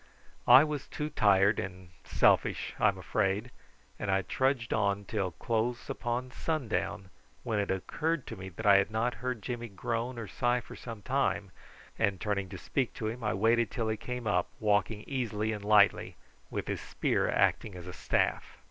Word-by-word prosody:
I 125 +3 +10
was 150 -3 -3
too 150 +1 -4
tired 100 -1 +4
and 95 -1 -6
selfish, - - +2
I'm - - +3
afraid, 105 +6 -1 0.5
and - - -3
I 95 0 +2
trudged 130 +2 0
on 100 -1 +1
till 100 -4 -1
close 115 +7 -2
upon 120 +2 -3
sundown, 120 - -2 0.3
when 110 -4 -1
it 100 - -1
occurred 155 - -1
to - - -7
me 95 0 -8
that 95 +5 -8
I 100 -1 +8
had 100 +1 +2
not 110 +3 0
heard 125 -4 -3
Jimmy 120 0 -4
groan 115 +4 -3
or 115 -3 -5
sigh 120 +5 +1
for - - -11
some 115 -4 -8
time, - - 0 0.5
and 95 -2 +1
turning 100 -2 -1
to - - -7
speak 130 -4 -2
to 110 - -4
him 120 +2 -6
I 105 - 0
waited 115 +2 +3
till 115 -2 -2
he 110 - 0
came 125 +1 -6
up, 90 -4 +1
walking 105 0 +1
easily 110 -5 -2
and 105 -1 -6
lightly, 105 -1 +4 0.3
with - - -3
his - - -3
spear - - 0
acting 100 - +1
as 90 -2 -9
a 90 - -7
staff. - - -1
110 Hz, 180 wpm, -30 LUFS, 100-120 Hz, 0.5 s, I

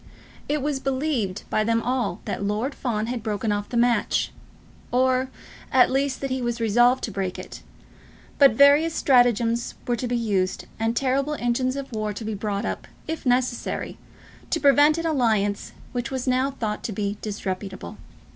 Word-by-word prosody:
It 295 -2 0
was 290 -2 -1
believed 260 -8 -1
by 215 - +2
them 230 +1 +2
all 250 -7 -1
that - - -3
Lord 215 +7 -1
Fawn 220 -6 -2
had 240 0 -3
broken 215 0 -2
off 205 0 -2
the 240 - -2
match 235 0 +2 0.6
or, 255 +1 +2 0.4
at 255 -1 +5
least, 270 0 0
that 275 -1 -3
he 260 0 -1
was 240 -1 -2
resolved 240 +3 +3
to 220 - -2
break 190 -2 -3
it; - - -9 0.8
but 275 -5 +7
various 285 +6 +5
stratagems 240 -2 +3
were 245 - +2
to 245 - -3
be 240 0 0
used, 195 -5 -1
and 225 +1 0
terrible 275 +3 +1
engines 255 +1 0
of 275 -1 -6
war 215 -1 -2
were 210 - -2
to 215 +2 -7
be 220 - -2
brought 205 0 -2
up, - - -4 0.2
if 320 -4 -4
necessary, 250 -1 -1 0.5
to 330 - 0
prevent 290 +2 +5
an 330 - -3
alliance 220 -9 +1 0.2
which 245 -2 -3
was 260 -2 -3
now 255 +1 +2
thought 220 -6 -3
to - - -2
be 205 0 -3
disreputable. 195 - -5
240 Hz, 175 wpm, -24 LUFS, 215-265 Hz, 0.8 s, but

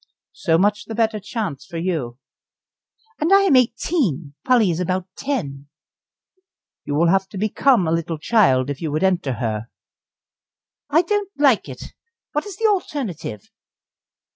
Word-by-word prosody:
"So 165 -1 +1
much 205 +3 +1
the 225 - -6
better 220 -1 +1
chance 200 - -4
for 165 +3 -8
you." 160 -9 -2 1.0
"And 315 +4 0
I 395 0 +7
am 375 -9 +4
eighteen, 235 - +1
Polly 240 -7 +3
is 165 - -3
about 185 +1 -1
ten." 145 - -4 1.2
"You 145 - -2
will 165 +3 +3
have 190 +1 +2
to 200 - -8
become 215 0 +2
a - - 0
little 165 0 -1
child 150 - +3
if 140 - -7
you 160 -3 -2
would 155 +5 -1
enter 180 -8 +1
her." 110 -1 -3 1.2
"I 320 +4 +4
don't 410 +2 -1
like 275 -6 +3
it. - - -9 0.4
What 295 +7 -2
is 400 - -8
the 450 - -1
alternative?" 255 - -2
190 Hz, 150 wpm, -21 LUFS, 155-260 Hz, 1.2 s, I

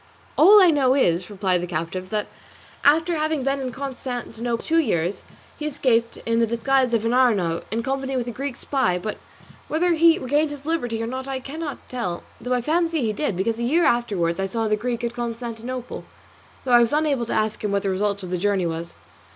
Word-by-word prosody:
"All 405 +7 +8
I 365 -4 +7
know 270 -3 +3
is," 180 -9 +1
replied 190 -3 0
the 180 - -4
captive, 175 +2 -4
"that 210 0 -1 0.6
after 325 +4 +4
having 310 -2 0
been 275 +1 0
in 260 -2 -3
Constantinople 245 -3 -4
two 330 +1 +3
years, 175 - 0 0.4
he 300 - -2
escaped 240 -5 +1
in 230 0 +1
the 230 - +3
disguise 255 +3 +1
of 225 0 -1
an 230 - +1
Arnaut, 205 -10 +2
in 230 +2 -2
company 270 0 -2
with 245 - -1
a 240 - -4
Greek 270 +2 -4
spy; 260 -11 0
but 210 +4 -5 0.5
whether 345 +3 +2
he 330 0 +5
regained 290 +4 +1
his 290 -1 -9
liberty 245 -9 -1
or - - -1
not 260 +3 -5
I 270 -1 -3
cannot 290 +2 -7
tell, 205 -9 -4 0.2
though 245 +2 -1
I 250 - +1
fancy 330 +3 +1
he 220 -2 0
did, 210 -6 -2
because 225 +4 -1
a - - -2
year 315 +8 +3
afterwards 195 -8 +1
I 195 - 0
saw 225 +3 -1
the 215 - +2
Greek 235 +2 -3
at 235 0 -2
Constantinople, 240 +1 -5 0.6
though 255 - -1
I 240 - +8
was 235 +2 +2
unable 290 -6 +1
to - - -2
ask 215 0 -1
him 210 - -1
what 200 0 0
the 195 - 0
result 200 +1 -1
of 180 - -6
the 180 - -1
journey 200 -1 +1
was." 165 0 -4
240 Hz, 215 wpm, -23 LUFS, 210-275 Hz, 0.6 s, All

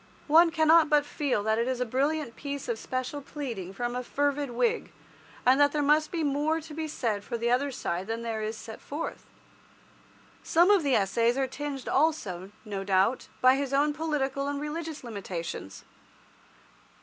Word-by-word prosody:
One 330 +3 +6
cannot 315 0 +5
but 295 -1 +4
feel 280 -8 -1
that 220 +1 +1
it 235 - 0
is 255 -1 -1
a 250 - +1
brilliant 275 +1 -1
piece 280 -1 -5
of 235 -2 -2
special 255 +4 -3
pleading 240 - -6
from 240 +5 -3
a 250 - -1
fervid 285 +1 0
Whig, 455 - 0 0.5
and 260 +3 +5
that 285 0 +4
there 295 -1 +1
must 305 +2 +3
be 335 -2 -2
more 295 +3 +1
to 315 -1 -10
be 315 +1 -3
said 225 -9 -2
for 235 - -4
the 235 +1 0
other 270 +3 +2
side 190 -8 -3
than 225 +1 -3
is - - -7
there 220 -2 -2
set 220 0 -9
forth. 295 +3 -6 1.1
Some 345 +5 +4
of 405 -3 +5
the 280 -4 +2
Essays 230 +5 +2
are 270 - +2
tinged 275 0 -5
also, 215 - 0 0.2
no 200 -2 -4
doubt, 195 +5 +2
by 255 0 +7
his 275 -1 -2
own 295 +2 +3
political 280 -3 -1
and 285 0 -2
religious 310 0 -5
limitations. 185 - -6
275 Hz, 180 wpm, -28 LUFS, 230-300 Hz, 1.1 s, by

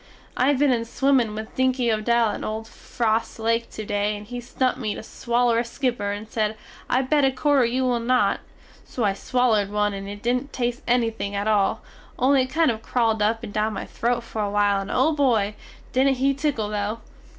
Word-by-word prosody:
I 255 - +2
have 285 -1 +3
been 285 0 +3
in 230 -1 0
swimmin 245 -2 +1
with 220 0 -7
Dinky 260 -2 +2
Odell 230 +1 +2
in - - -5
old 220 +1 -4
Frost 225 0 -2
Lake 230 +1 0
to 215 - -7
day 205 +1 -1
and 205 - -10
he 245 +3 -6
stumpt 255 +1 -1
me 215 -4 -2
to - - -7
swaller 235 0 +1
a - - +1
skipper 240 -3 -2
and 205 +2 -5
sed 215 -1 -1 0.3
I 255 +2 +2
bet 290 +2 +2
a 270 - +5
quarter 275 -1 +2
you 250 +3 0
will 245 -2 +1
not, 235 -4 +2 0.4
so 245 - -4
I 200 -2 +2
swallerd 220 -2 +1
one 210 0 0
and 195 0 -6
it 205 0 -8
didn't 250 +4 -1
test 245 0 -2
ennything 225 -4 0
at 200 +1 -1
all, 205 -2 +2 0.3
only 265 +1 +4
it 255 - -1
kind 315 -1 +3
of 220 -1 -6
crawled 225 -3 0
up 225 +2 +1
and 205 -3 -7
down 215 +1 0
my 195 - -5
throte 240 +1 -1
fer 225 - -7
awhile 205 -1 +2
and 195 - -7
o 265 +5 +3
Boy! 235 -8 +2 0.4
didnt 270 +1 +3
he 275 +2 +2
tickel 270 -7 -1
though! 210 +2 -2
230 Hz, 210 wpm, -24 LUFS, 210-255 Hz, 0.4 s, a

